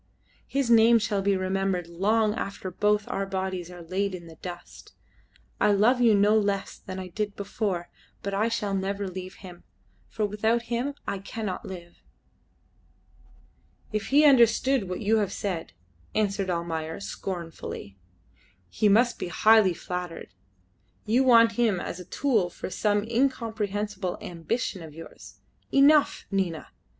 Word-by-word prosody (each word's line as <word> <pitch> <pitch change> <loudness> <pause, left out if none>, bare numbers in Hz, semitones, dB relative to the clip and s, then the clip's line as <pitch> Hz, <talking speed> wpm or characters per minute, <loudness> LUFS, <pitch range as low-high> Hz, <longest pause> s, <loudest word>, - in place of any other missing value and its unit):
His 270 -3 0
name 230 +1 +7
shall 210 -2 0
be 195 0 +2
remembered 185 -1 -1
long 210 +5 +1
after 195 -4 -5
both 210 +2 +1
our 195 0 -2
bodies 190 -2 -3
are 175 -1 -10
laid 190 +3 -2
in 175 -2 -10
the 165 -1 -13
dust. 175 0 -10 0.7
I 210 - +4
love 235 +5 +3
you 230 -3 +5
no 205 +2 +4
less 200 -2 0
than 185 -1 -8
I 185 -1 -6
did 205 +2 -3
before, 195 -3 -3 0.4
but 200 - -3
I 210 +3 +1
shall 210 -3 -2
never 195 +1 -2
leave 185 0 -7
him, 175 -1 -11 0.5
for 215 - -1
without 220 +3 0
him 265 +4 -1
I 200 - -2
cannot 200 0 -5
live." 175 -2 -10 1.9
"If 215 -1 -2
he 295 +3 +5
understood 250 -4 +4
what 180 - -4
you 220 +1 +3
have 205 -3 0
said," 180 -5 -4 0.4
answered 200 -2 0
Almayer, 165 -2 -3
scornfully, 170 - -6 0.7
"he 210 - +2
must 235 +4 +3
be - - -3
highly 205 +1 +5
flattered. 180 - -6 0.7
You 240 +5 +3
want 230 -3 +6
him 225 -4 +1
as 175 - -5
a 180 - -9
tool 220 -4 +1
for 180 - -7
some 205 0 +1
incomprehensible 215 -5 -1
ambition 180 +3 -3
of 155 -2 -10
yours. 165 - -12 0.4
Enough, 290 +2 +4
Nina. 185 -5 -2
200 Hz, 145 wpm, -26 LUFS, 185-225 Hz, 1.9 s, name